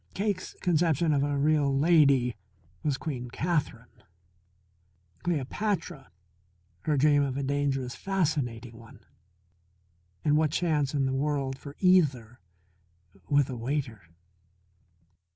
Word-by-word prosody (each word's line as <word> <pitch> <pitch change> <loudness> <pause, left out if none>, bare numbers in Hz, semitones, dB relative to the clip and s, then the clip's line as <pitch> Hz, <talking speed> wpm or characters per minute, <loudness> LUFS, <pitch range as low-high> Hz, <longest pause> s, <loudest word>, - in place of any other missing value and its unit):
Cake's 200 -2 -2
conception 165 -2 +2
of 140 - +2
a 145 0 0
real 145 -1 +2
lady 140 -6 +4 0.5
was 145 -3 -1
Queen 125 -6 -5
Katherine; 135 -7 -3 1.2
Cleopatra 175 0 -2 0.8
her 150 -2 +1
dream 145 +1 +4
of 135 -2 -1
a 140 - -2
dangerous, 135 -2 -1
fascinating 130 - -2
one. 115 -1 -16 1.2
And 150 0 +4
what 155 0 +2
chance 150 -3 0
in 140 -1 +1
the 130 - -1
world 135 -1 -1
for 140 +1 -11
either 140 - +3 0.9
with 145 -2 +3
a - - -4
waiter? 125 -2 -3
145 Hz, 110 wpm, -28 LUFS, 130-155 Hz, 1.2 s, lady